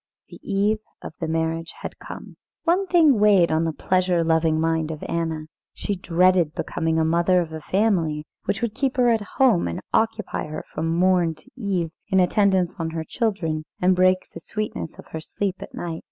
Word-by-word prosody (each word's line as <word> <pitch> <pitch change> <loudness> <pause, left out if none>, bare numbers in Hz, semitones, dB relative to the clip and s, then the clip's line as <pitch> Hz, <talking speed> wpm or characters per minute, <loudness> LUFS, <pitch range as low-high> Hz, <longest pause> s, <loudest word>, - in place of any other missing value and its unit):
The - - -12
eve 205 +2 +1 0.2
of - - -7
the 165 - -2
marriage 165 +1 -2
had - - -6
come. - - -9 0.3
One 370 +3 +2
thing 315 - +5
weighed 200 -5 +5
on 160 +1 +2
the 165 - 0
pleasure 180 +1 +1
loving 160 -1 +2
mind 160 -1 0
of 155 -1 -6
Anna. 160 -2 -2 0.3
She 205 - -2
dreaded 180 -2 +2
becoming 160 0 -1
a 160 - +2
mother 170 +3 +3
of 165 -2 -3
a 160 - -6
family 170 -7 +1 0.2
which 200 - -1
would 230 -3 -1
keep 270 +3 -1
her 245 -1 +4
at 225 -2 +2 0.2
home, 250 - +4
and 85 - -3
occupy 225 -5 0
her 155 - -6
from 160 - -2
morn 175 -1 +2
to 155 - -22
eve 190 -9 -2 0.2
in 190 - +3
attendance 185 -1 +3
on 165 -1 -1
her 160 0 -4
children, 165 -7 -1 0.2
and 185 +1 +3
break 185 0 +3
the - - -7
sweetness 215 -6 -5
of - - -12
her 160 - -5
sleep 195 +3 -3
at - - -9
night. 165 -2 -4
175 Hz, 195 wpm, -23 LUFS, 160-205 Hz, 0.3 s, thing